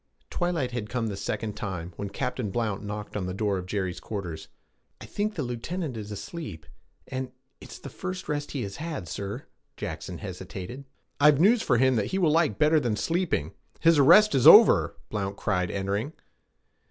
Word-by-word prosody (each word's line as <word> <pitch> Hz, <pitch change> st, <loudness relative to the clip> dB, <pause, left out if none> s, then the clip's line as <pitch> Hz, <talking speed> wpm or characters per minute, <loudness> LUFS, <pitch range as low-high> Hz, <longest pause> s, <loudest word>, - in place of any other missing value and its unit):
Twilight 170 Hz, -8 st, -1 dB
had 115 Hz, -4 st, -4 dB
come 120 Hz, -2 st, -1 dB
the 100 Hz, -, -4 dB
second 105 Hz, +2 st, -3 dB
time 90 Hz, -5 st, -5 dB
when 100 Hz, +2 st, -5 dB
Captain 105 Hz, +1 st, -3 dB
Blount 105 Hz, -1 st, -2 dB
knocked 105 Hz, 0 st, -6 dB
at 105 Hz, -, -2 dB
the 90 Hz, -, -4 dB
door 100 Hz, -2 st, 0 dB
of 90 Hz, -, -8 dB
Jerry's 95 Hz, -2 st, -2 dB
quarters. 85 Hz, -7 st, -6 dB, 0.5 s
'I -, -, -9 dB
think 210 Hz, +1 st, -2 dB
the 150 Hz, -, -2 dB
lieutenant 130 Hz, +5 st, -4 dB
is 105 Hz, -1 st, -7 dB
asleep 130 Hz, -, -7 dB, 0.4 s
and 130 Hz, -1 st, -4 dB, 0.3 s
it's -, -, -10 dB
the -, -, -10 dB
first 185 Hz, 0 st, -6 dB
rest 145 Hz, -1 st, -2 dB
he 140 Hz, -, -2 dB
has 100 Hz, -1 st, -6 dB
had, 155 Hz, -, -5 dB
sir' 100 Hz, +4 st, -5 dB, 0.3 s
Jackson 80 Hz, +3 st, -5 dB
hesitated. 95 Hz, +6 st, -7 dB, 0.3 s
'I've 145 Hz, -1 st, +6 dB
news 220 Hz, +7 st, +5 dB
for 120 Hz, -, +2 dB
him 130 Hz, 0 st, +3 dB
that 105 Hz, -, 0 dB
he 190 Hz, -, -2 dB
will 170 Hz, -5 st, +3 dB
like 160 Hz, -1 st, +2 dB
better 155 Hz, +1 st, +4 dB
than 120 Hz, -6 st, -1 dB
sleeping! 165 Hz, -, -1 dB, 0.3 s
His 165 Hz, -2 st, +5 dB
arrest 175 Hz, +10 st, +7 dB
is 135 Hz, +1 st, +4 dB
over!' 210 Hz, +6 st, +8 dB, 0.2 s
Blount 100 Hz, -2 st, -3 dB
cried, 90 Hz, -4 st, 0 dB
entering. 100 Hz, -, -2 dB
115 Hz, 180 wpm, -27 LUFS, 100-155 Hz, 0.5 s, over